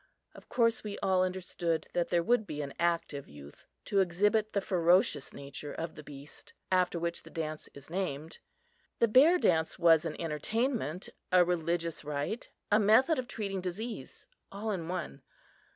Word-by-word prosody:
Of - - -15
course, 230 -2 +2
we 210 -2 -5
all 185 -1 +3
understood 180 -3 -2
that 175 -1 0
there 170 -1 +2
would 235 +1 +2
be 150 -1 -4
an 140 - -6
active 165 -4 -1
youth 70 0 -13 0.2
to 200 - +1
exhibit 205 +4 +2
the 200 - +1
ferocious 180 -5 +2
nature 140 +1 -7
of 165 +1 -5
the - - -10
beast 145 -1 -11 0.2
after 180 -1 +2
which 170 0 -2
the - - -14
dance 155 -1 -5
is 140 0 -11
named. 160 -4 -4 0.6
The 235 - +4
Bear 280 +11 +6
Dance 160 - +2
was 165 -2 +5
an 160 - -4
entertainment, 180 - -2 0.2
a 180 -1 +6
religious 170 -1 -1
rite, 150 +9 -3 0.2
a 210 - +6
method 255 +9 +4
of 250 - -4
treating 200 -5 -3
disease 210 +6 -6 0.2
all 210 +2 -3
in 175 -5 -3
one. 175 - -4
175 Hz, 165 wpm, -31 LUFS, 160-205 Hz, 0.6 s, Bear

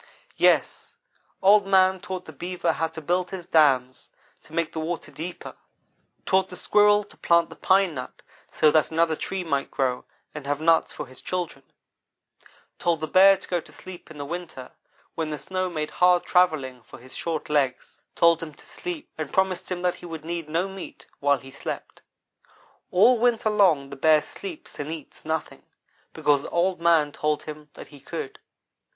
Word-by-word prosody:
"Yes - - +2 0.5
Old 200 +1 +6
man 190 -1 +4
taught 185 -1 -6
the 160 - -10
Beaver 175 +1 -2
how 165 0 -1
to 160 0 -9
build 180 +3 0
his 185 -3 -7
dams 130 -6 +2 0.3
to - - -19
make 165 -1 -1
the 160 - -3
water 165 +2 -4
deeper; 175 +3 -7 0.7
taught 190 0 +2
the 180 - -9
Squirrel 210 +2 +4
to 205 - -18
plant 170 0 +2
the - - -9
pine 190 -2 +3
nut 130 -3 -8 0.3
so 155 - +3
that 155 -1 +3
another 165 0 +2
tree 190 +4 -4
might 140 -4 -1
grow 130 -2 -1 0.3
and 150 -2 -8
have 145 0 -1
nuts 165 +1 +3
for - - -6
his 130 -1 -12
children; 175 -6 -4 1.2
told 170 -2 +1
the 155 - -3
Bear 195 +2 +7
to 190 - -13
go 175 -2 -1
to - - -15
sleep 185 -1 -11
in 155 - -11
the 145 - -5
winter, 170 -5 -7 0.4
when 160 -1 -3
the 150 - -3
snow 185 +6 -3
made 155 -3 -4
hard 180 0 +4
travel 180 -3 +4
ling 130 -3 -9
for - - -14
his 130 +2 -12
short 165 -2 -3
legs 140 -1 -1
told 170 -1 +4
him 155 -3 -7
to - - -18
sleep, 355 -4 -6
and 155 -3 -4
promised 190 -1 0
him 180 0 -3
that 180 -1 +1
he 175 - -8
would 160 -2 -8
need 165 -2 -4
no 170 +4 0
meat 195 -1 -10
while 140 0 +3
he 135 0 -13
slept. 135 - -7 0.9
All 230 +7 +5
winter 230 -2 +2
long 170 -10 +3
the - - -6
Bear 155 +2 +4
sleeps 365 -5 -9
and 145 +1 -4
eats 160 -2 -9
nothing, 160 0 -3 0.5
because 145 -1 +1
Old 175 0 0
man 165 -3 +4
told 150 +1 -1
him 150 -1 -9
that - - -11
he 145 - -14
could. 420 - -7
165 Hz, 185 wpm, -25 LUFS, 150-185 Hz, 1.2 s, Bear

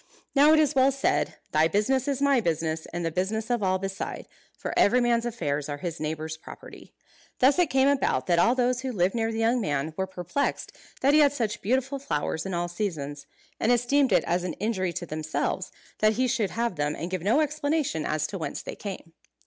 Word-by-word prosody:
Now 290 +2 +6
it 315 - +6
is 305 -1 +3
well 270 0 +4
said, 275 +1 0 0.2
"Thy 155 +1 +4
business 215 - +1
is 280 -1 0
my 280 -3 +4
business, 160 -3 -1
and 175 0 -3
the 165 - -1
business 215 +7 -2
of 240 -2 +1
all 190 -1 +2
beside;" 195 0 -5 0.3
for - - -4
every 245 +5 +4
man's 240 -1 +2
affairs 150 -11 -2
are 145 - -3
his 165 +1 -5
neighbours' 155 +1 -4
property. - - -12 0.5
Thus 270 +6 +4
it 350 -4 +3
came 265 0 +3
about 265 - +1
that 170 -1 +2
all 230 +7 +4
those 250 0 +1
who 260 -1 -3
lived 185 -4 +1
near 225 -1 0
the 225 - -4
young 230 +2 +2
man 150 -3 -1
were 190 - -1
perplexed 185 - -2 0.3
that 275 +2 +4
he 305 - +6
had 285 -2 +5
such 225 -7 -2
beautiful 265 +5 0
flowers 160 - -2
in 190 - -3
all 175 0 -1
seasons; 155 -6 -4 0.3
and 235 - +2
esteemed 245 +2 +3
it - - +4
as 175 +1 0
an 180 - -3
injury 190 -4 -1
to 175 - -5
themselves 155 -1 -3 0.3
that 215 0 +4
he 255 +4 +1
should 230 -5 0
have 235 -3 -2
them 145 +1 -1
and 170 +2 -5
give 185 -2 -2
no 210 - +3
explanation 300 - 0
as 155 0 -1
to 195 +3 -5
whence 160 - -4
they - - -6
came. 190 -5 -8
210 Hz, 215 wpm, -26 LUFS, 170-260 Hz, 0.5 s, Now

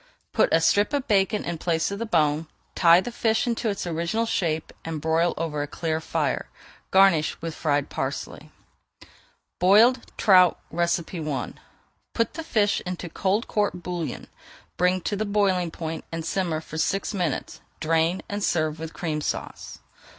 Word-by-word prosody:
Put - - +3
a 165 - +5
strip 205 - +3
of 285 -1 -1
bacon 205 0 +2
in 170 -2 -4
place 165 +1 0
of 200 - -4
the 230 - -3
bone, 155 -3 +1 0.3
tie 170 0 +6
the 245 - -5
fish 225 -1 +1
into 235 -1 -1
its 200 - -3
original 170 +7 -1
shape 160 -8 -1
and 165 -1 -4
broil 160 +3 +1
over 155 -3 -2
a 145 - -3
clear 160 +1 -2
fire. - - -2 0.4
Garnish 190 -5 +4
with 165 0 -5
fried 145 -3 -1
parsley. - - -4 1.1
BOILED 225 +7 +5
TROUT 185 -4 +5 0.2
I 170 -5 -1 0.6
Put 230 - 0
the 325 +1 -5
fish 210 -9 +1
into 180 -1 -5
cold 200 +6 0
court 205 -4 -1
bouillon, 170 -7 -4 0.5
bring 180 +1 +2
to 205 - -2
the 210 - -1
boiling 200 -4 +1
point, 160 0 -5
and 165 -1 -4
simmer 170 -4 -1
for 160 0 -7
six 195 +6 0
minutes, 175 -7 -3 0.2
drain, 165 +3 +1
and 205 0 -4
serve 155 -3 0
with 160 0 -6
Cream 155 -3 -3
Sauce. - - -5
175 Hz, 160 wpm, -25 LUFS, 160-200 Hz, 1.1 s, tie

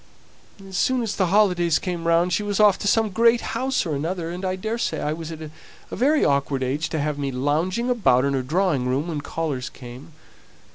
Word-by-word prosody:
As 190 -1 -5
soon 255 -2 +1
as 220 - -3
the 185 - +1
holidays 180 -4 +3
came 175 -3 -4
round 170 +2 +3
she 185 - +1
was 205 -1 -2
off 210 -2 +5
to - - -2
some 220 0 +2
great 230 +3 +4
house 260 +1 0
or 160 - -2
another; 165 +4 -3
and 180 +2 -6
I 185 0 -1
daresay 220 +5 -2
I 150 - -1
was 165 0 -7
at 160 -1 -7
a 155 - -9 0.4
very 290 +4 +3
awkward 140 -1 0
age 140 +5 -2
to 160 - -2
have 145 0 -2
me 140 -1 -2
lounging 155 - -1
about 200 - +3
in 140 - 0
the 135 - 0
drawing 150 -2 0
room 140 +6 -1
when 150 -3 -3
callers 145 -5 -3
came. 125 +5 -12
170 Hz, 210 wpm, -23 LUFS, 145-205 Hz, 0.4 s, off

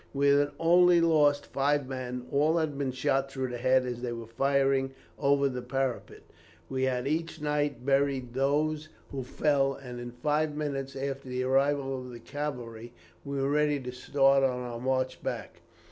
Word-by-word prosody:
We 140 +1 +3
had 145 +1 +4
only 175 +1 +5
lost 150 -4 +3
five 140 0 0
men; 125 -1 -5
all 150 +4 +3
had 155 -3 0
been 140 -2 -1
shot 135 +1 0
through 130 -1 -3
the 120 -1 -5
head 130 +1 +3
as 120 -1 -4
they 125 -1 -3
were 115 -1 -6
firing 135 +2 +1 0.3
over 140 0 +3
the 125 -2 -4
parapet. 130 0 -3 0.5
We 130 0 0
had 125 0 -1
each 165 +2 -2
night 145 -4 -1
buried 135 -3 +1
those 150 +3 0 0.2
who 135 - -3
fell, 135 +1 +1
and 125 -2 -8
in 120 0 -6
five 150 +4 -1
minutes 140 -3 -3
after 135 -1 -4
the 125 0 -2
arrival 135 +1 +1
of 125 - -9
the 120 -1 -9
cavalry, 120 -5 -6 0.3
were 140 -1 -2
ready 150 0 +2
to 125 -1 -6
start 135 +2 +3
on 130 -2 +1
our 120 -1 -5
march 130 +1 -1
back. - - -5
135 Hz, 175 wpm, -29 LUFS, 130-145 Hz, 0.5 s, only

